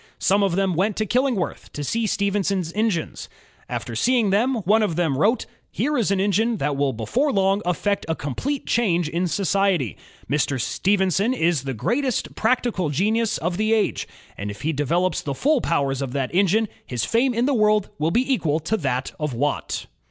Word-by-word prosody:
Some 200 +2 +2
of 195 -4 +1
them 195 -1 +1
went 195 +5 0
to 215 - 0
Killingworth 245 -3 -1
to 145 - -4
see 225 - -1
Stephenson's 195 -4 0
engines. 210 -6 -2 0.4
After 120 - -4
seeing 235 - +2
them, 240 +7 +2
one 215 +4 +4
of 205 -7 0
the 175 0 +1
men 140 - 0
wrote: 220 +8 +2 0.3
''Here 300 +1 -1
is 230 -8 +1
an 200 -1 +1
engine 215 +4 +1
that 145 -6 -1
will 140 0 +1
before 235 - 0
long 195 -1 +2
effect 200 +3 -1
a 160 - +1
complete 255 - -3
change 175 -8 +1
in 170 +3 -1
society. 185 - +1 0.3
Mr. 140 -1 0
Stephenson 195 - +1
is 165 - +1
the 135 -2 -3
greatest 250 - -1
practical 225 -7 0
genius 215 +9 +1
of 175 +2 -2
the 215 +1 +2
age, 220 -2 0 0.3
and 100 +1 -3
if 100 +5 -8
he 160 +2 0
develops 170 +6 0
the 140 -2 -4
full 285 - +2
powers 140 -5 0
of 130 -2 -4
that 135 -1 -2
engine 200 +4 +3 0.2
his 120 -4 -3
fame 245 +2 +1
in 235 +2 +2
the 285 - +2
world 215 -3 +2
will 155 +2 +1
be 255 +9 +2
equal 155 - 0
to 195 +8 -1
that 135 -6 -2
of 150 -5 -2
Watt.'' 145 +5 -2
195 Hz, 190 wpm, -23 LUFS, 155-220 Hz, 0.4 s, one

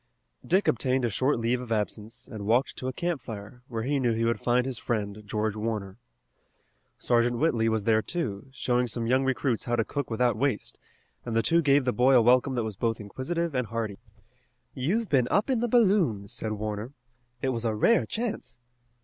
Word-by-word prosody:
Dick 190 +3 +2
obtained 130 +1 +2
a 115 - -1
short 130 +7 +1
leave 120 +2 0
of 125 -2 -8
absence, 110 +1 -3
and 105 -2 -7
walked 120 +5 +2
to 130 - -4
a - - -1
campfire, 125 - -5
where 115 -2 -4
he 140 +3 0
knew 120 -3 +2
he 115 +1 0
would 115 0 0
find 125 +1 +2
his 130 -3 -4
friend, 105 -2 -2
George 110 0 -1
Warner. 105 -2 -4 1.0
Sergeant 120 0 +2
Whitley 115 -6 +2
was 110 -2 0
there, 110 0 +3
too, 115 - -4
showing 125 -2 0
some 115 0 -2
young 130 +3 +2
recruits 130 -2 0
how 120 - 0
to 115 -2 +1
cook 145 -2 -3
without 120 0 +1
waste, 130 -1 -1 0.4
and 115 -2 -4
the 115 - +3
two 170 +6 +3
gave 140 -3 +3
the 125 - +1
boy 130 +2 +4
a 120 - +7
welcome 125 +3 +4
that 120 - 0
was 110 -2 -4
both 115 +3 -1
inquisitive 160 +10 -3
and 125 -3 -1
hearty. 110 -2 -4 0.7
"You've 190 - 0
been 130 -7 +2
up 210 +6 +2
in 250 - +2
the 240 - 0
balloon," 190 - +3
said 110 -1 -3
Warner. 105 +4 -4 0.5
"It 135 - +2
was 120 -3 -2
a 110 -2 0
rare 230 - +3
chance." 230 - -4
120 Hz, 200 wpm, -27 LUFS, 110-135 Hz, 1.0 s, a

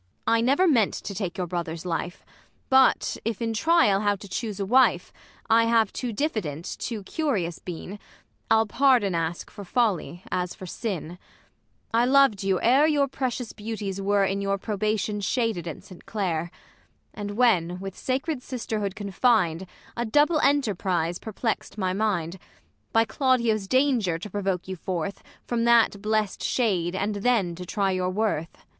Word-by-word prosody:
I 230 0 +3
never 275 +10 +3
meant 235 - +3
to 200 - -6
take 190 -1 -4
your 180 - -1
brother's 170 -1 -4
life; 175 +1 -4 0.5
But, 265 0 +4
if 225 -2 -2
in 230 -1 -1
trial 320 -6 +3
how 205 0 +1
to 200 +1 -11
chuse 210 +1 -4
a 195 - -1
wife, 255 +6 +3 0.3
I 230 +1 +5
have 230 -1 +2
too 250 -2 -3
diffident, 205 - -2
too 225 -4 -4
curious 195 - -2
been, 185 +3 -7 0.5
I'll 225 0 +4
pardon 240 -4 +3
ask 165 0 -3
for 205 - -9
folly, 195 -4 -1
as 180 -1 -2
for 185 - -9
sin; 180 -3 -5 0.7
I 235 +1 +4
loved 270 -6 +4
you 195 -2 +1
ere 270 +6 +5
your 290 -3 +2
precious 255 -3 -3
beauties 205 -3 -5
were 200 0 +2
In 195 +1 -1
your 195 0 0
probation 210 0 -2
shaded 215 -4 -1
at 160 - -7
Saint 185 - -15
Clare: 175 -6 -2 0.6
And, 205 0 -6
when 180 -8 +2
with 195 0 -6
sacred 270 +2 -2
sisterhood 220 -6 -3
confin'd, 195 -4 +1 0.3
A 235 - -1
double 295 +7 +3
enterprise 190 - +1
perplext 220 0 -3
my 185 -3 0
mind; 190 -4 -1 0.5
By 225 0 +4
Claudio's 235 -7 +1
danger 250 -9 +2
to 205 +5 -8
provoke 195 -3 -2
you 190 - -4
forth 185 +1 -4 0.2
From 235 -1 -1
that 230 -4 +4
blest 215 -1 -1
shade, 185 -8 0
and 205 +2 -1
then 205 -5 +1
to 180 +1 -8
try 195 0 0
your 185 -1 0
worth, 185 -5 -2
ISAB. - - -25
205 Hz, 160 wpm, -25 LUFS, 185-235 Hz, 0.7 s, I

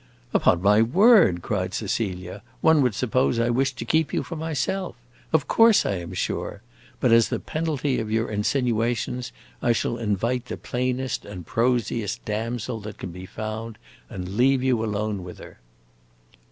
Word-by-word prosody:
"Upon 90 0 +3
my 105 +2 +5
word," 165 - +5
cried - - -2
Cecilia, 95 -3 -3 0.2
"one 160 -2 +5
would 125 -6 +1
suppose 125 +1 +1
I 115 +1 +2
wished 135 +1 0
to 115 - -5
keep 160 +4 +1
you - - 0
for 165 - -7
myself. 160 +4 -2 0.4
Of 150 -3 +2
course 225 -2 +5
I 100 - 0
am 85 +1 -7
sure! - - -3 0.4
But 125 - +2
as 115 -1 +5
the - - -1
penalty 150 -4 -1
of 110 - -4
your 115 +1 +1
insinuations, 120 +2 -1 0.3
I 120 - +3
shall 115 +1 -1
invite 115 +3 -1
the - - -6
plainest 125 +1 -2
and 90 -4 -9
prosiest 115 -2 -1
damsel 110 +1 -3
that 105 -1 -8
can 90 - -6
be 90 +2 -9
found, 110 +2 -6 0.3
and 90 -4 -6
leave 130 +1 +3
you 125 -4 +2
alone 105 -2 -2
with 90 0 -9
her." - - -13
115 Hz, 165 wpm, -24 LUFS, 105-130 Hz, 0.4 s, my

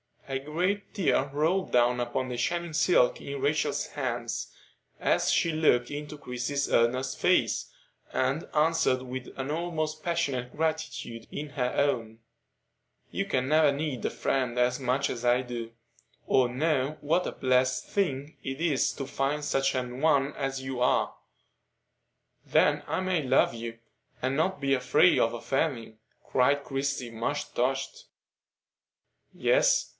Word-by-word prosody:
A 135 -1 -2
great 180 +8 -2
tear 155 -8 +1
rolled 165 +6 0
down 125 0 +4
upon 120 +2 -2
the 125 - -4
shining 170 +6 -1
silk - - +3
in 420 - -6
Rachel's 430 - 0
hands - - -4 0.4
as - - +2
she 165 - +2
looked 150 -6 +2
into 150 +1 -6
Christie's 140 +1 -3
earnest 120 +3 +2
face, - - +2 0.4
and 135 +5 0
answered 150 -4 +3
with 130 0 -6
an 135 +2 -3
almost 155 -1 -2
passionate 140 -8 -1
gratitude 155 -7 -3
in 150 +1 -5
her 125 -3 -2
own: 115 -6 0 0.9
"You - - -1
can 130 0 -1
never 155 -2 +5
need 140 -3 -3
a - - +2
friend 125 -3 -1
as 125 +1 +2
much 130 +2 0
as 120 -1 -4
I 120 +1 +4
do, 120 -2 -6 0.5
or 130 -2 +3
know 140 +2 0
what 165 +5 +1
a - - -4
blessed 130 0 +1
thing 150 -7 -2
it 135 +3 -5
is 155 -6 +2
to 135 - -5
find 140 +2 -1
such 135 -2 +1
an 125 0 -3
one 140 -2 +3
as 135 -1 -3
you 130 -1 -4
are." 125 - +2 1.3
"Then - - +3
I - - -1
may 185 -3 +1
love 130 -3 +3
you, 115 0 -6 0.4
and 130 +2 0
not 160 0 0
be 135 0 +2
afraid 125 +7 +4
of 115 - +2
offending?" 120 -2 -2 0.3
cried 140 +2 +2
Christie, 135 -3 -2
much 115 +6 -3
touched. 135 - -1 1.3
"Yes. - - +3
135 Hz, 145 wpm, -28 LUFS, 125-155 Hz, 1.3 s, never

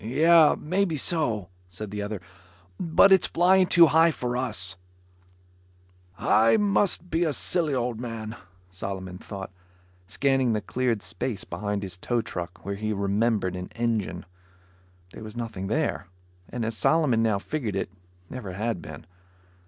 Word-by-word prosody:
"Yup, 155 +7 +5
maybe 180 +1 0
so," 120 - +1 0.2
said 95 +3 -7
the 105 0 -4
other. 105 0 -4 0.6
"But 170 +3 +5
it's 190 -2 +5
flying 185 +2 +4
too 170 -1 +7
high 160 +2 +5
for 125 -6 -3
us." 105 -7 -4 1.4
"I 115 - +4
must 200 -3 +1
be 165 +2 +2
a 155 -3 0
silly 155 +2 0
old 120 -2 -2
man," 115 -2 -6 0.4
Solomon 95 -1 -6
thought, 95 -2 -8 0.6
scanning 135 0 +1
the 105 - -1
cleared 120 -3 -1
space 110 -7 -3
behind 100 +3 -3
his 95 -1 -7
tow 120 +5 0
truck 90 -5 -7
where 100 - -2
he 110 +2 -2
remembered 100 -1 0
an 90 0 -5
engine. 115 -6 -2 0.9
There - - -11
was 110 +2 -9
nothing 110 -5 -4
there, 145 - -1 0.4
and 120 -2 -3
as 115 0 -2
Solomon 145 -5 +2
now 110 -3 +2
figured 115 -1 -4
it, 95 - -2 0.4
never 105 -6 -7
had 110 -1 -2
been. 80 +1 -10
115 Hz, 145 wpm, -26 LUFS, 100-150 Hz, 1.4 s, too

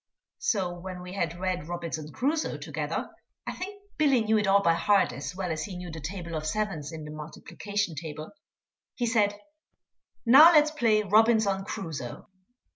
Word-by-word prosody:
So 190 -6 0
when 180 0 -7
we 180 0 -8
had 170 -3 -2
read 180 -4 -2
Robinson 165 -3 -5
Crusoe 295 - -1
together - - -4 0.3
I - - -3
think 400 +2 -7 0.2
Billy 275 -5 +4
knew 220 0 +2
it 210 - 0
all 200 +1 +4
by 170 - +4
heart 195 -2 +2
as 140 +7 -6
well 185 -2 -3
as 155 -1 -2
he 190 -4 -7
knew 180 -1 -7
the 160 - -7
table 170 +2 -6
of 155 -1 -3
sevens 165 -6 -2
in 160 -2 -7
the 150 - -8
multiplication 175 +5 -4
table 155 +2 -7 0.6
he 245 - -1
said, 210 -3 +1 0.9
"Now 295 +8 +9
let's 300 -1 +5
play 225 -8 +2
Robinson 210 -1 +3
Crusoe." 160 - -6
190 Hz, 170 wpm, -28 LUFS, 165-220 Hz, 0.9 s, Now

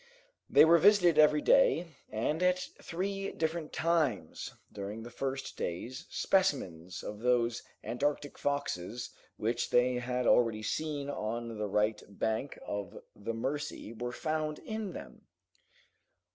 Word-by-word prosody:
They - - +8
were 170 +1 +7
visited 180 -3 +6
every 155 - +6
day, 485 - +4 0.2
and 150 +10 -1
at 180 0 +4 0.2
three 195 +3 -3
different 160 0 -2
times, 150 - 0 0.2
during 105 +2 -5
the 120 - -9
first 135 +2 -4
days, 125 - -4
specimens 95 - 0
of 105 0 -6
those 120 0 +2 0.2
Antarctic 145 +3 -2
foxes 120 -6 -2 0.3
which 115 +2 -1
they 125 0 +3
had 125 0 -1
already 115 -3 +4
seen 145 +4 -2
on 115 -3 -3
the 105 - -1
right 105 +2 +1
bank 110 +6 -2
of 100 -3 -4 0.2
the 115 +3 -4
Mercy 130 -2 -3
were 120 +2 -4
found 155 +2 -2
in 220 -4 -5
them. - - -10
130 Hz, 130 wpm, -32 LUFS, 110-160 Hz, 0.3 s, They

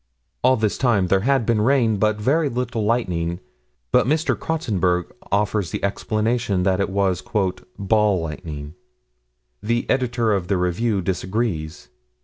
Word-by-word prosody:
All 130 +1 +5
this 110 -2 -1
time 105 -8 +2
there 95 - +4
had 130 +3 +1
been 115 -2 +2
rain, 115 -3 +3
but 105 +1 +1
very 145 +7 +2
little 120 -2 -2
lightning, 90 -7 0 0.5
but - - +4
Mr. 155 +3 +1
Crotsenburg 95 - -1 0.2
offers 105 -2 +1
the - - -5
explanation 105 0 0
that 95 0 +2
it 100 - 0
was 95 -2 0 0.6
"ball 105 -1 +2
lightning." 75 -2 -6 0.9
The 115 +2 -1
Editor 120 -4 +1
of 95 -3 -1
the 100 0 +1
Review 95 +3 0
disagrees. 90 - -3
105 Hz, 135 wpm, -22 LUFS, 90-120 Hz, 0.9 s, All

